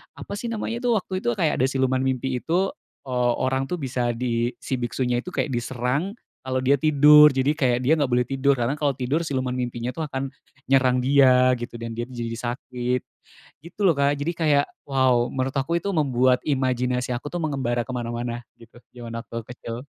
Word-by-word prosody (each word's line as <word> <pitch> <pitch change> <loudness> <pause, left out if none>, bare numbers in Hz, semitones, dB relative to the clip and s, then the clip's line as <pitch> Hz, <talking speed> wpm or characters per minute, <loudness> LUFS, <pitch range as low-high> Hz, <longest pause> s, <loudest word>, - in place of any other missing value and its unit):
apa - - -8
sih 235 - -4
namanya 230 +1 -3
tuh, 235 - +3
waktu 185 0 -4
itu, - - +1
kayak 155 +3 0
ada 130 - +3
siluman 130 -1 +1
mimpi 130 -1 -1
itu, 180 +8 0 0.4
eee, 125 -1 +1
orang 130 +1 0
tuh 180 - -2
bisa 125 -3 -1
di 120 0 -1
si 130 - -1
biksunya 125 0 -1
itu - - -25
kayak 145 - -1
diserang 125 - -2 0.3
kalau 130 0 -2
dia 135 +2 +4
tidur. 150 +1 +7
Jadi 135 +2 +2
kayak 125 -5 +1
dia 145 +6 +4
nggak 145 - +2
boleh 125 0 +3
tidur, 135 +1 +2
karena 120 +2 -1
kalau 145 -2 +1
tidur 135 +5 -1
siluman 130 -3 -1
mimpinya 120 -1 -3
tuh 160 -2 -3
akan 135 -1 -4 0.4
nyerang 130 -2 +4
dia 130 -2 +5
gitu, 120 0 -7
dan 115 0 -5
dia 120 +1 -3
tuh 130 - -10
jadi 115 -1 -4
sakit, 125 +1 -3 0.6
gitu 170 +5 -14
loh, 170 - +4
Kak. 140 +1 +2
Jadi 150 +4 -1
kayak, 150 -3 +3 0.2
wow, 130 -3 +3
menurut 130 +1 -2
aku 140 +5 0
itu 200 - -6
membuat 130 -6 +2
imajinasi 125 -2 0
aku 120 - -6
tuh 175 - -3
mengembara 130 -5 -1
ke - - -5
mana-mana, 120 0 -4 0.2
gitu, 120 +1 -16 0.2
zaman 120 -1 -7
aku 115 0 -7
kecil. 120 -1 -7
130 Hz, 195 wpm, -24 LUFS, 120-140 Hz, 0.6 s, tidur